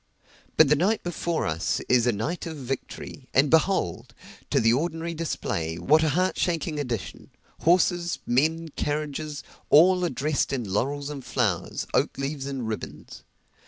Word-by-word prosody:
But 155 - +7
the 150 - +5
night 195 +9 +1
before 170 -1 -2
us 80 0 -1
is 125 -1 +3
a - - +5
night 150 - -3
of 160 -2 -6
victory; 135 0 -6
and 135 +1 +4
behold! 160 - +1 0.3
to - - +3
the 115 0 +4
ordinary 165 +4 -1
display, 85 - -3
what 150 - +4
a 160 - +2
heart 185 +5 0
shaking 165 -3 -1
addition! 120 -8 -5 0.3
horses, 175 0 +2
men, 160 +6 +1
carriages 150 0 -3 0.3
all 180 +4 +6
are 175 - +1
dressed 150 0 -1
in 135 -3 -1
laurels 140 +9 -2
and 140 -3 -7
flowers, 105 -11 -1
oak - - +1
leaves 135 0 -3
and 135 -4 -4
ribbons. 110 -1 -7
145 Hz, 155 wpm, -26 LUFS, 125-165 Hz, 0.3 s, But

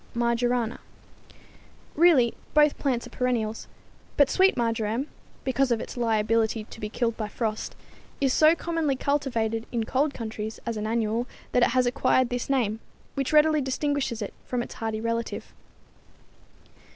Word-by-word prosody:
Marjorana_). 235 0 0 1.2
Really, 295 -8 +5 0.2
both 300 -1 +4
plants 255 -4 0
are - - -11
perennials, 230 -3 -1 0.5
but 285 -2 +5
sweet 380 -4 +4
marjoram, 230 +1 0 0.4
because 270 0 +1
of 235 -2 +1
its - - -7
liability 225 -1 +1
to 225 - -13
be 210 - -4
killed 230 0 -1
by 215 -2 -3
frost, 215 0 -3 0.4
is 270 -2 +2
so 310 +1 +6
commonly 330 -5 -1
cultivated 240 -6 -1
in 235 -2 0
cold 275 +6 0
countries 220 -1 -5
as 230 - -2
an 215 0 -3
annual 230 +1 0 0.2
that 250 - +3
it 240 - +5
has 255 -1 +3
acquired 255 0 +2
this 245 0 -3
name, 225 -6 +1 0.3
which 275 -2 -2
readily 305 0 +5
distinguishes 265 -3 -1
it 200 - -6
from 245 -1 -2
its - - -9
hardy 220 -1 -3
relative. 230 +1 -3
240 Hz, 150 wpm, -26 LUFS, 225-275 Hz, 1.2 s, so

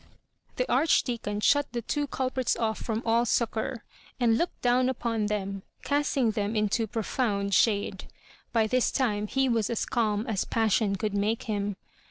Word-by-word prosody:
The - - -1
Archdeacon 235 -9 +1
diut 285 +5 +4
the 235 -1 -3
two 290 +5 -1
culprits 260 -1 -1
off 220 -2 -1
from 225 0 -3
all 230 +1 +3
succour, 235 +1 -1 0.4
and 235 -2 +4
looked 340 +9 -1
down 250 +1 +3
upon 230 -4 -1
them, 195 -2 -3 0.2
cast 290 0 0
ing 240 -5 +3
them 210 0 -2
mto 215 +1 0
profound 210 -3 -1
shade. 200 -3 +2 0.5
By 225 -2 +3
this 250 +3 +2
time 210 -5 0
he 270 +4 +1
was 230 -4 +1
as 235 - -1
calm 215 -2 0
as 220 -6 -1
passion 220 -2 +1
oould 210 +1 -2
make 210 +3 0
him. 205 -2 -2
225 Hz, 165 wpm, -28 LUFS, 210-245 Hz, 0.5 s, diut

